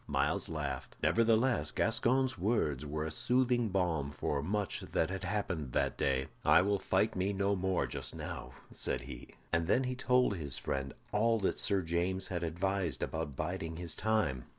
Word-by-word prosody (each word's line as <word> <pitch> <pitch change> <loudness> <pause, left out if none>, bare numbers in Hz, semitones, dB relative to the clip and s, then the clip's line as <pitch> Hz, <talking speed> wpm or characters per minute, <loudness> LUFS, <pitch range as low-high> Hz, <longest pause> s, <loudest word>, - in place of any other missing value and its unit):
Myles - - 0
laughed. - - -4
Nevertheless 115 +2 +3
Gascoyne's 125 +4 +2
words 85 - 0
were 75 +1 -2
a 80 - -3
soothing 125 +4 +2
balm 85 -7 0
for 70 0 -2
much 100 +6 -1
that 80 - -1
had 95 0 -4
happened 90 - -2
that - - +1
day. 65 -1 +1 0.2
"I - - +6
will 100 0 +1
fight - - +1
me 95 +2 0
no 100 +1 +1
more 95 -1 0
just - - -4
now," - - -6 0.2
said - - -1
he; - - -10 0.2
and 80 0 +2
then 125 +7 +3
he 130 0 -1
told 125 -4 +2
his 70 -6 -3
friend 70 0 -3 0.2
all 115 +2 +3
that 95 - 0
Sir 100 -3 +1
James 90 +3 -1
had 85 -2 -2
advised 85 -2 -1
about 80 -4 -3
biding 80 +4 -3
his 85 -2 -2
time. 105 - 0
95 Hz, 175 wpm, -33 LUFS, 80-110 Hz, 0.2 s, I